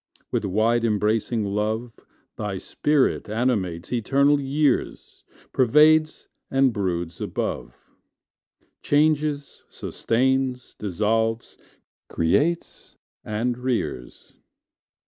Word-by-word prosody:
With - - -1
wide 110 +4 +1
embracing 110 0 0
love 110 +4 -2 0.4
Thy 105 -2 -4
spirit 145 +4 0
animates 105 -6 -1
eternal 140 +5 +3
years 140 0 -1 0.3
Pervades 155 +5 +4 0.2
and 135 -2 +3
broods 90 -5 -3
above, - - -3 1.1
Changes, 150 -1 +1
sustains, 130 +1 -1
dissolves, 110 +3 -1 0.5
creates, 145 - -1 0.3
and 120 +3 -2
rears. 120 - -4
120 Hz, 75 wpm, -24 LUFS, 105-135 Hz, 1.1 s, Pervades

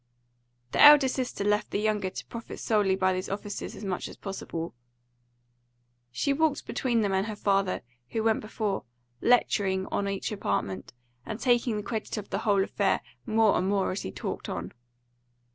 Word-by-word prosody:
The - - +2
elder 295 -2 +10
sister 255 -5 -2
left 210 +1 +1
the - - -1
younger 210 -3 0
to - - -7
profit 230 -1 -8
solely 205 -4 +2
by 185 0 +2
these 185 +1 -3
offices 205 +1 -5
as 205 - -8
much 185 -2 -2
as - - -11
possible. 170 -4 -5 1.4
She 200 - 0
walked 305 0 +1
between 240 -3 0
them 200 -2 0
and 190 +2 +1
her 215 - -4
father, 195 -2 +1 0.3
who 225 - -1
went 220 -1 +2
before, 215 -2 -3 0.4
lecturing 195 -6 +3
on 200 - 0
each 195 +2 -3
apartment, 100 - -2 0.3
and 215 - -5
taking 240 -3 +2
the 210 - -3
credit 220 0 -4
of 205 - -6
the - - 0
whole 200 -2 +3
affair - - +1 0.3
more 220 -1 +4
and 185 - +1
more 200 -1 +1
as 185 - -3
he 95 - -5
talked - - -5
on. - - -4
205 Hz, 175 wpm, -28 LUFS, 190-225 Hz, 1.4 s, elder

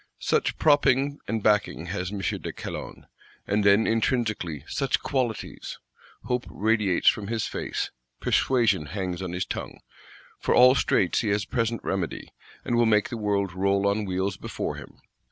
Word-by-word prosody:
Such - - 0
propping 145 -2 +3
and 110 0 -2
backing 105 -5 +2
has 90 -2 -3
M. 100 -2 -4
de - - -3
Calonne; - - -7 0.4
and 105 +1 +1
then 100 +2 +5
intrinsically 110 - 0
such 135 -2 0
qualities! 125 -5 -3 0.5
Hope 125 +1 -2
radiates 105 -3 +1
from 105 -2 +4
his 115 -1 -1
face; - - -3 0.3
persuasion 110 - +2
hangs 90 +1 -4
on 90 -2 -4
his 90 +1 -2
tongue. - - -6 0.6
For - - +1
all 125 +1 +8
straits 100 -8 +2
he 115 - -2
has 100 -1 +1
present 115 +2 -1
remedy, 95 -4 -3 0.3
and 120 - 0
will 120 -1 +4
make 105 -2 +3
the - - -4
world 100 -4 -1
roll 100 +1 +1
on 105 +1 0
wheels 95 +1 -2
before - - -4
him. - - -12
105 Hz, 155 wpm, -26 LUFS, 95-115 Hz, 0.6 s, all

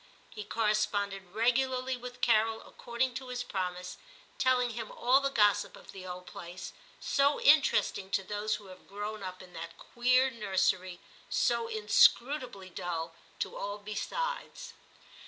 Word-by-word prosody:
He 210 - -6
corresponded 205 -3 0
regu 240 +5 +2
larly 255 0 -2
with 250 0 -9
Carol, 225 -1 +3
according 245 +2 -2
to 260 - -10
his 250 -1 -3
promise, 180 -5 -4 0.4
telling 250 -2 +3
him 225 -1 -6
all 255 +3 +4
the 275 - +1
gossip 210 -6 +3
of - - -13
the 185 -1 -9
old 180 0 -7
place, 175 +1 -8 0.3
so 280 +1 +2
interesting 280 -9 +4
to 195 - 0
those 210 +2 -1
who 210 - -10
have 185 -1 -14
grown 205 +1 -5
up 185 -1 -7
in 180 -1 -16
that 165 +1 -8
queer 255 +2 +2
nursery, 190 -4 0 0.3
so 235 -2 +1
inscrutably 220 -1 +3
dull 170 -2 -4 0.2
to - - -3
all 205 +1 -4
besides. - - -4
215 Hz, 145 wpm, -31 LUFS, 190-250 Hz, 0.4 s, all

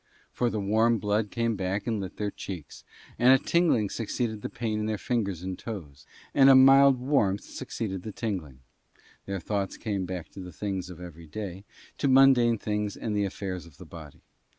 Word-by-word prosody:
For 120 - 0
the 110 - -2
warm 110 +4 +2
blood 105 +1 0
came 115 0 -1
back 95 +1 -2
and 110 -4 -1
lit 95 -2 -7
their 105 -1 -2
cheeks, 90 -7 -8 0.4
and 125 +2 +6
a 135 - +8
tingling 145 - +2
succeeded 110 -1 -3
the - - -4
pain 110 -2 -3
in 105 - -2
their 110 -1 -1
fingers 100 -7 -2
and 95 -1 -5
toes, 75 - -8 0.3
and 135 -1 +6
a 135 - +9
mild 135 0 +7
warmth 125 -7 +1
succeeded 95 -5 -5
the 110 - -6
tingling: 90 - -5 0.7
their 100 0 -3
thoughts 100 +1 -3
came 100 -4 -3
back 90 -2 -5
to - - -12
the 90 -1 -8
things 95 0 -4
of 90 -2 -10
every 85 -2 -10
day, 95 +3 -6 0.3
to 140 - +1
mundane 130 -3 +5
things 105 -1 -2
and 110 -2 -3
the 100 -1 +1
affairs 95 -2 -5
of 75 -5 -18
the - - -11
body. - - -12
105 Hz, 195 wpm, -27 LUFS, 95-115 Hz, 0.7 s, a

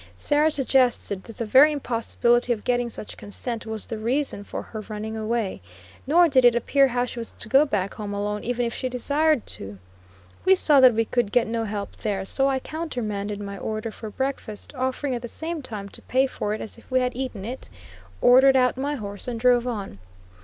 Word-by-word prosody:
Sarah 295 - +2
suggested 255 -8 +1
that 230 - -11
the 230 - -2
very 265 +8 +7
impossibility 240 -2 +1
of 215 - -7
getting 245 -1 0
such 215 - -7
consent 225 +2 -6
was 220 -1 -3
the 220 - -5
reason 240 -1 -1
for - - -6
her 220 - -7
running 215 +1 -5
away; 220 - -2 0.5
nor 340 +4 +6
did 265 -4 +3
it 240 -1 +6
appear 275 +3 +3
how 245 -1 0
she 245 - -7
was 230 - -5
to - - -10
go 270 +6 +5
back 200 -8 -1
home 210 -2 -6
alone 205 +1 -2
even 245 0 -1
if 235 - -2
she 255 - -3
desired 285 +3 +1
to. 100 0 -5 0.7
We 380 0 +6
saw 300 -6 +5
that 255 -3 +7
we 225 0 +2
could 235 -3 0
get 245 +1 +3
no 225 0 -2
help 205 -1 -5
there, 195 -3 -2
so 270 +7 +1
I 270 - +1
countermanded 220 -10 -4
my 200 -1 -6
order 220 +1 -3
for 220 0 -8
breakfast, 265 -2 -4
offering 260 +1 -2
at 240 - -3
the 240 - -5
same 320 +5 -5
time 210 -6 -6
to - - -7
pay 260 +1 +2
for 210 -5 -3
it - - -7
as 220 - -8
if - - -21
we 255 - +3
had 250 -1 -1
eaten 250 -6 -4
it, 250 +4 -7 0.5
ordered 265 +2 +7
out 250 -1 +3
my 285 +2 -1
horse 205 -4 -6
and 235 -2 -3
drove 245 0 +3
on. 205 - -5
240 Hz, 210 wpm, -24 LUFS, 215-265 Hz, 0.7 s, very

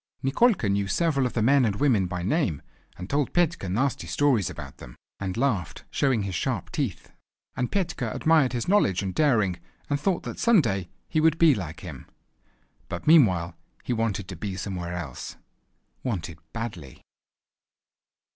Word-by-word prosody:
Nikolka 160 - +3
knew 100 0 +1
several 140 - +1
of - - -7
the 115 - +1
men 135 +3 +5
and 105 -4 +1
women 110 -7 +2
by 90 0 -4
name, 105 - 0 0.3
and 90 - -7
told 140 +3 0
Petka 170 - +1
nasty 130 +8 0
stories 130 - +2
about - - -9
them, - - -12 0.2
and 95 -2 -3
laughed 110 - -1
showing 130 -7 +1
his 95 -1 -4
sharp 120 +8 -2
teeth. 135 - -3 0.4
And 125 -1 -2
Petka 165 - -1
admired 155 -4 +3
his 120 -2 -2
knowledge 140 - +3
and 95 -1 -3
daring, 110 - +2 0.3
and 145 - +1
thought 180 +4 0
that - - -6
some 230 -3 +5
day 95 - -1 0.2
he 155 - +1
would 160 0 +4
be 165 -3 +6
like 85 - -5
him. - - -9 0.8
But 90 - -5
meanwhile 95 - +5 0.3
he - - -1
wanted 110 -5 -1
to 95 - -6
be 95 +3 -4
somewhere 90 -2 -4
else. 75 -8 -6 0.7
Wanted 85 - -3
badly! 95 - -7
115 Hz, 165 wpm, -26 LUFS, 95-145 Hz, 0.8 s, be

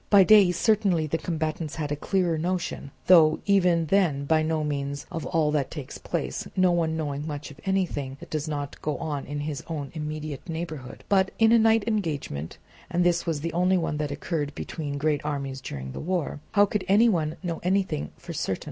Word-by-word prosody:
By 200 -2 +8
day 205 -2 +7
certainly 190 -3 +2
the 160 +2 -1
combatants 160 -2 -3
have 150 -2 -3
a - - +1
clearer 175 +2 0
notion, 175 -2 -2 0.2
though 160 -4 +7
even 180 -4 +3
then 160 -6 +2
by 155 +2 +3
no 155 0 0
means 140 -1 -3
of 165 - -4
all 155 -3 +2
that 145 -3 0
takes 145 -5 -7
place, - - -3
no 185 -1 +4
one 165 -2 +1
knowing 145 -1 -3
much 150 -1 -5
of 145 - -14
anything 165 -9 -1
that - - -12
does 155 0 -2
not 145 -2 -4
go 150 -2 -2
on 150 -3 -4
in 145 +1 -4
his 145 -2 -4
own 150 -4 -4
immediate 155 -1 -5
neighbourhood; 160 -6 -6
but 190 -1 +3
in 225 0 +5
a 235 - +7
night 225 -1 +4
engagement 150 - -2 0.3
(and 175 +1 +1
this 175 0 +2
was 155 -3 -1
the 165 0 -3
only 180 +2 +3
one 165 -3 -1
that 150 -1 -2
occurred 145 0 -3
between 145 -3 -4
great 150 0 0
armies 140 -3 -3
during 65 - -6
the - - -6
war) 175 -4 -2
how 205 0 +6
could 205 0 -2
any 210 +5 +5
one 160 -7 +1
know 170 -2 -3
anything 185 - 0
for - - -8
certain? - - -2
160 Hz, 200 wpm, -26 LUFS, 145-180 Hz, 0.3 s, By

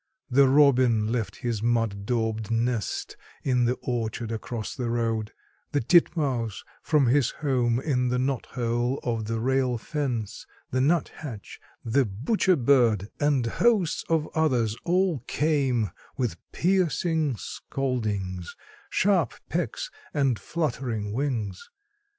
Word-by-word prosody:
The 135 +2 +6
robin 130 -6 +4
left 115 -3 -2
his 120 -5 -3
mud 115 -4 0
daubed 110 -2 -1
nest 115 -1 -1 0.3
in 125 -2 +2
the 125 +2 +1
orchard 115 -2 -2
across 110 0 -4
the 125 -3 -3
road, 115 -2 -1 0.4
the 145 - +3
titmouse 135 - +2 0.2
from 150 -4 +3
his 125 +1 +3
home 125 -5 0
in 130 -3 0
the 125 +1 +1
knot 130 0 -1
hole 120 +1 -1
of 115 -3 -1
the 115 +1 -2
rail 130 0 +1
fence, 120 -5 -3 0.2
the 130 - +1
nuthatch, 145 - -2 0.3
the 130 +5 +3
butcher 140 - +1
bird 120 - +3
and 145 -4 +2
hosts 195 - +2
of 160 -2 +2
others 125 -9 +1
all 180 -3 +2
came, 135 -8 +1 0.3
with 120 - -1
piercing 165 -5 +1
scoldings, 105 -7 -3 0.3
sharp 185 - +2
pecks - - -2 0.2
and 135 -6 +2
fluttering 120 -10 -2
wings. 115 -8 -2
125 Hz, 120 wpm, -26 LUFS, 115-145 Hz, 0.4 s, The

